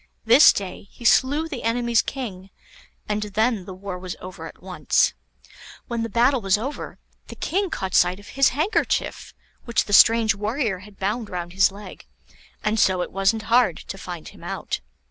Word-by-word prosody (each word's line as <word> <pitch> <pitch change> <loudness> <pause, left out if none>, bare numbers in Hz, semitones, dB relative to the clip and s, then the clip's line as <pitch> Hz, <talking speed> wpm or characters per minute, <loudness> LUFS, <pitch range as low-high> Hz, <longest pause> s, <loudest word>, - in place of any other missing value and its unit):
This 245 +6 +8
day 195 0 -6
he 240 - -13
slew 290 +7 +3
the 275 -6 -6
enemy's 235 0 +1
king, 195 -8 -6 0.6
and 210 0 -1
then 210 0 0
the 190 - -8
war 185 -1 -6
was 180 -1 -6
over 185 0 -8
at - - -14
once. - - +1 0.7
When 235 -2 -3
the 230 - -3
battle 245 +4 +2
was 195 0 +2
over, 265 +7 -6 0.3
the - - -9
King 390 +2 -1
caught 190 - -4
sight 180 +2 +3
of 205 - -14
his 275 0 +3
handkerchief, 315 - -1 0.3
which 235 - +1
the 205 - -5
strange 225 0 +6
warrior 210 0 -2
had 200 +1 -15
bound 210 +3 -2
round 175 -1 -5
his 190 +1 +4
leg, 200 - -11 0.6
and 215 +1 0
so 185 -3 +3
it - - -8
wasn't 195 +3 +1
hard 230 -6 +3
to 195 - -8
find 175 -4 -7
him - - -16
out. - - -4
210 Hz, 180 wpm, -23 LUFS, 190-240 Hz, 0.7 s, This